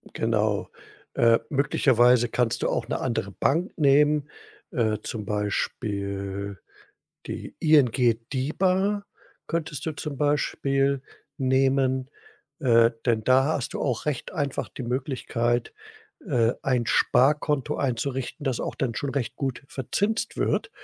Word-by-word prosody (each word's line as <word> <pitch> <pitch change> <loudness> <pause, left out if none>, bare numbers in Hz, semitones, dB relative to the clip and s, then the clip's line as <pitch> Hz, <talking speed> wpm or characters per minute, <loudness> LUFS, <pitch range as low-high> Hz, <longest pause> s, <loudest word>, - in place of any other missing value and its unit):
Genau, 110 -2 0 0.5
äh, 115 -1 +5
möglicherweise 125 -4 +4
kannst 120 -1 0
du - - +2
auch - - -2
'ne - - -1
andere - - -2
Bank 165 +6 0
nehmen, 150 +1 +4 0.4
äh, 110 -3 +1
zum 110 -3 -5
Beispiel 100 -1 -3 0.7
die - - -6
ING 125 -7 +4
DiBa 190 +9 +1 0.4
könntest 160 -3 -3
du 160 - -1
zum 145 -1 -6
Beispiel 140 -1 +1 0.4
nehmen, 130 0 +2 0.5
äh, 115 -3 +5 0.2
denn 110 -2 +2
da 130 +1 +5
hast 145 -4 -2
du - - -3
auch 125 0 -1
recht 145 -5 -2
einfach 140 -3 -2
die 130 - -8
Möglichkeit, 120 -1 -1 0.5
äh, 120 -6 +2
ein 125 -4 +1
Sparkonto 150 +1 +2
einzurichten, 135 +2 -2
das 130 -3 -1
auch - - -3
dann 120 -4 -2
schon 140 - -2
recht 130 -5 -3
gut 135 -3 -3
verzinst 205 - -2
wird, - - 0
130 Hz, 125 wpm, -25 LUFS, 115-145 Hz, 0.7 s, äh